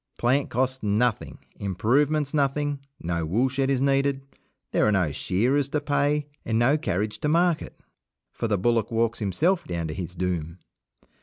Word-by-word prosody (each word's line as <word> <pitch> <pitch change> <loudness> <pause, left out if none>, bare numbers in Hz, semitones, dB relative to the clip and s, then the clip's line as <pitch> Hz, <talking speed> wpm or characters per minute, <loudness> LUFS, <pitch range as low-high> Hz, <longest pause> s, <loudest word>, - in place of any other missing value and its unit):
Plant 130 +4 +1
costs 130 +2 -1
nothing, 110 +2 0 0.2
improvements 140 - +1
nothing 145 0 0 0.2
no 85 0 -2
woolshed 125 - 0
is 135 -1 +1
needed, 140 0 +1 0.5
there - - +3
are - - +3
no 90 -7 +1
shearers 125 - +1
to 150 - 0
pay, 145 0 +1 0.2
and 110 - 0
no 120 +5 +4
carriage 105 - -2
to - - -1
market, 170 +1 +1 0.5
for 115 - -2
the 105 -2 +1
bullock 115 +3 +1
walks 115 0 0
himself 155 - +1
down 85 -2 -3
to - - -3
his 90 +1 -6
doom. 85 -2 -2
120 Hz, 155 wpm, -25 LUFS, 100-145 Hz, 0.5 s, no